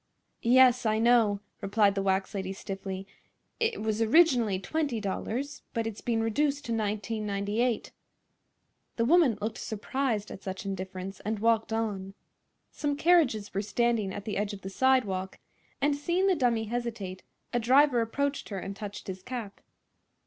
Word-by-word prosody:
"Yes, 250 Hz, +1 st, +5 dB
I 220 Hz, -1 st, +2 dB
know," 225 Hz, -3 st, +4 dB, 0.2 s
replied 200 Hz, 0 st, +3 dB
the 195 Hz, -, -1 dB
wax 190 Hz, +1 st, 0 dB
lady, 190 Hz, -1 st, -3 dB
stiffly; 195 Hz, -1 st, -6 dB, 0.5 s
"it 455 Hz, -, 0 dB
was 220 Hz, 0 st, 0 dB
originally 235 Hz, -, +4 dB
$20, 250 Hz, 0 st, -2 dB
but 230 Hz, -1 st, 0 dB
it's 225 Hz, -2 st, -5 dB
been 230 Hz, -2 st, 0 dB
reduced 285 Hz, +6 st, 0 dB
to 235 Hz, -, -4 dB
$19.98." 215 Hz, +1 st, -1 dB, 1.0 s
The 230 Hz, -, +1 dB
woman 300 Hz, -, +4 dB
looked 215 Hz, +2 st, -3 dB
surprised 220 Hz, 0 st, -2 dB
at -, -, -8 dB
such 190 Hz, +1 st, -6 dB
indifference 190 Hz, 0 st, -5 dB
and 215 Hz, +1 st, -2 dB
walked 225 Hz, +1 st, +2 dB
on. 200 Hz, -4 st, -2 dB, 0.6 s
Some 290 Hz, -1 st, -1 dB
carriages 290 Hz, -, +3 dB
were 200 Hz, -, 0 dB
standing 225 Hz, -1 st, 0 dB
at 200 Hz, +1 st, -6 dB
the 215 Hz, -, -3 dB
edge 205 Hz, +1 st, -1 dB
of 200 Hz, -, -8 dB
the 190 Hz, -, -6 dB
sidewalk, 200 Hz, -7 st, +1 dB, 0.4 s
and 285 Hz, 0 st, +2 dB
seeing 345 Hz, +6 st, 0 dB
the 390 Hz, -, +4 dB
dummy 245 Hz, -8 st, +1 dB
hesitate 220 Hz, -5 st, -4 dB, 0.3 s
a 240 Hz, -, +2 dB
driver 255 Hz, +1 st, +4 dB
approached 280 Hz, +5 st, -2 dB
her 200 Hz, -, -4 dB
and 195 Hz, +1 st, -5 dB
touched 205 Hz, 0 st, -7 dB
his 190 Hz, -1 st, -6 dB
cap. 230 Hz, -2 st, -6 dB
220 Hz, 150 wpm, -29 LUFS, 200-250 Hz, 1.0 s, Yes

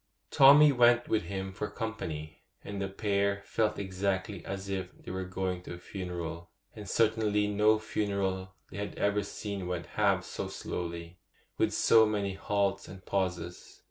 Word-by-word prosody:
Tommy 145 Hz, +2 st, +8 dB
went 120 Hz, -2 st, +4 dB
with 110 Hz, -5 st, +1 dB
him 95 Hz, +1 st, -4 dB
for 105 Hz, +3 st, -4 dB
company, 80 Hz, -, -5 dB, 0.2 s
and 100 Hz, -1 st, -5 dB
the 100 Hz, -, -1 dB
pair 100 Hz, 0 st, 0 dB
felt 110 Hz, 0 st, 0 dB
exactly 95 Hz, -1 st, -2 dB
as 100 Hz, 0 st, -5 dB
if 95 Hz, -1 st, -3 dB
they -, -, -9 dB
were 95 Hz, 0 st, -3 dB
going 90 Hz, 0 st, -3 dB
to 90 Hz, -, -7 dB
a -, -, -10 dB
funeral; 85 Hz, -2 st, -6 dB, 0.3 s
and 105 Hz, -3 st, -8 dB
certainly 110 Hz, -2 st, +2 dB
no 105 Hz, +1 st, +4 dB
funeral 100 Hz, -3 st, -2 dB, 0.2 s
they -, -, -8 dB
had 100 Hz, 0 st, -4 dB
ever 105 Hz, 0 st, +2 dB
seen 100 Hz, -1 st, -5 dB
went 90 Hz, -1 st, -3 dB
half -, -, +1 dB
so -, -, -4 dB
slowly, 85 Hz, -1 st, -5 dB
and 85 Hz, +2 st, -17 dB, 0.4 s
with -, -, +3 dB
so 110 Hz, -1 st, +5 dB
many 100 Hz, -2 st, -1 dB
halts 100 Hz, 0 st, -1 dB
and 95 Hz, 0 st, -11 dB
pauses. 90 Hz, -3 st, -3 dB
100 Hz, 165 wpm, -30 LUFS, 95-105 Hz, 0.4 s, Tommy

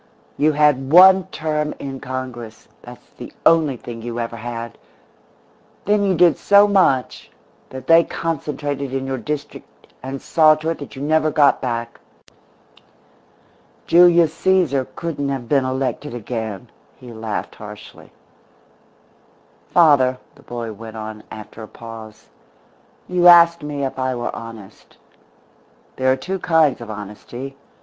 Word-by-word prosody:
"You 150 Hz, +1 st, +2 dB
had 145 Hz, -2 st, +2 dB
one 190 Hz, +1 st, +7 dB
term 150 Hz, -1 st, -3 dB
in 135 Hz, -1 st, -7 dB
Congress 125 Hz, -4 st, -7 dB
that's 120 Hz, 0 st, -13 dB
the -, -, -9 dB
only 155 Hz, -5 st, +4 dB
thing 115 Hz, -1 st, -9 dB
you 120 Hz, +1 st, -5 dB
ever 115 Hz, 0 st, -4 dB
had. 115 Hz, 0 st, -7 dB, 1.1 s
Then 205 Hz, 0 st, +2 dB
you 195 Hz, -2 st, +1 dB
did 170 Hz, -1 st, +4 dB
so 200 Hz, 0 st, +5 dB
much 185 Hz, -11 st, +1 dB, 0.4 s
that 130 Hz, 0 st, -9 dB
they 165 Hz, +2 st, +6 dB
concentrated 145 Hz, -5 st, -4 dB
in 135 Hz, 0 st, -3 dB
your 135 Hz, -1 st, -3 dB
district 150 Hz, +1 st, -8 dB
and 135 Hz, +1 st, -6 dB
saw 155 Hz, +1 st, +4 dB
to 155 Hz, +1 st, -4 dB
it 165 Hz, -, -5 dB
that 145 Hz, -, -9 dB
you 135 Hz, -, -6 dB
never 155 Hz, +1 st, +2 dB
got 145 Hz, -1 st, +3 dB
back. 115 Hz, -2 st, -4 dB, 1.9 s
Julius 170 Hz, -1 st, +5 dB
Caesar 170 Hz, -9 st, +1 dB
couldn't 150 Hz, -4 st, -4 dB
have 135 Hz, -4 st, -4 dB
been 135 Hz, +1 st, +2 dB
elected 130 Hz, 0 st, -3 dB
again," 110 Hz, -4 st, -6 dB, 0.3 s
he 125 Hz, -2 st, -11 dB
laughed 110 Hz, -1 st, -5 dB
harshly. 105 Hz, 0 st, -12 dB, 1.6 s
"Father," 140 Hz, -7 st, +4 dB, 0.2 s
the -, -, -20 dB
boy 115 Hz, -2 st, -6 dB
went 110 Hz, +1 st, -10 dB
on, 110 Hz, 0 st, -7 dB
after 110 Hz, +1 st, -11 dB
a 110 Hz, -, -8 dB
pause, 110 Hz, -2 st, -12 dB, 0.8 s
"you 180 Hz, -1 st, +3 dB
asked 170 Hz, -1 st, +7 dB
me 145 Hz, -1 st, -4 dB
if 135 Hz, -, -5 dB
I 130 Hz, 0 st, -1 dB
were 120 Hz, 0 st, -4 dB
honest. 115 Hz, -4 st, -12 dB, 1.0 s
There 130 Hz, 0 st, +2 dB
are 130 Hz, -, +1 dB
two 190 Hz, +7 st, -4 dB
kinds 160 Hz, -7 st, +2 dB
of 115 Hz, -, -9 dB
honesty. 110 Hz, +6 st, -8 dB
135 Hz, 140 wpm, -20 LUFS, 115-155 Hz, 1.9 s, one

